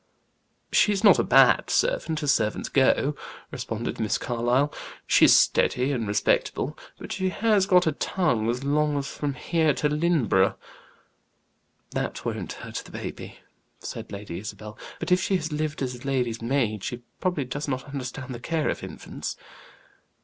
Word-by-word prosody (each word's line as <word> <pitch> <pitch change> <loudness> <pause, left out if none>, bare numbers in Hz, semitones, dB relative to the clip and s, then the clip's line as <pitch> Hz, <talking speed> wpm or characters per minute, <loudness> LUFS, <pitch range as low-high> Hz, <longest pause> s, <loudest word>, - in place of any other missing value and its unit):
"She's 205 -1 +3
not 210 - +7
a - - +3
bad - - +5
servant, 165 - 0
as 140 - +4
servants 110 -2 -1
go," 140 +2 +3 0.4
responded 115 +1 -4
Miss 110 -2 +1
Carlyle. 125 +4 0 0.3
"She's - - +6
steady 130 +3 +2
and 115 -6 -2
respectable; 105 +1 0 0.2
but - - -9
she 190 0 -1
has 205 -1 +2
got 180 -2 +5
a 160 - +3
tongue 125 - 0
as 125 +3 -2
long 150 +1 +1
as 140 - -2
from 145 -2 -3
here 160 +1 +1
to 150 - 0
Lynneborough." 150 - +2 1.4
"That - - -3
won't - - -3
hurt - - -6
baby," - - -7 0.4
said - - -7
Lady 100 -4 -6
Isabel. 105 +1 -8 0.2
"But 170 +2 -4
if 180 0 +4
she 190 - +1
has 160 -3 -2
lived 150 -1 -2
as 125 -1 -5
lady's 125 -4 -1
maid, 115 -4 0
she 120 0 -5 0.2
probably 175 -7 -1
does 145 +4 -4
not 130 -2 -2
understand 135 -1 -6
the 120 - -7
care 160 +4 -1
of - - -3
infants." - - -6
140 Hz, 155 wpm, -26 LUFS, 120-160 Hz, 1.4 s, not